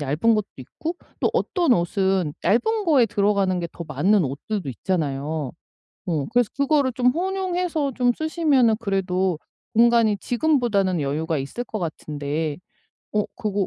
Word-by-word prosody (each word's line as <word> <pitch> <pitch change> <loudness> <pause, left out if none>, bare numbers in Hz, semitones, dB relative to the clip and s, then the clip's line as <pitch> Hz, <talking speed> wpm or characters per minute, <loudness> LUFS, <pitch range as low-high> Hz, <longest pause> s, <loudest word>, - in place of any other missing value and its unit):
얇은 150 +11 +2
것도 215 - 0
있고 315 - -6 0.2
또 - - +2
어떤 345 -8 +2
옷은 185 -3 +1
얇은 430 - +2
거에 280 -8 +4
들어가는 200 -3 +1
게 170 - -3
더 170 - -7
맞는 190 +4 +2
옷들도 145 +6 -4
있잖아요. 145 -1 -2 0.5
어 160 -7 -1
그래서 245 -3 +2
그거를 280 -1 +2
좀 245 +1 +1
혼용해서 360 -3 -1
좀 245 0 +2
쓰시면은 300 -8 +2
그래도 190 -4 0 0.4
공간이 230 -2 +4
지금보다는 235 - +1
여유가 155 +3 -1
있을 140 - -4
것 225 - -5
같은데, 150 -2 -3 0.6
어 210 -1 +1
그거 205 -5 -1
205 Hz, 305 characters per minute, -23 LUFS, 165-250 Hz, 0.6 s, 거에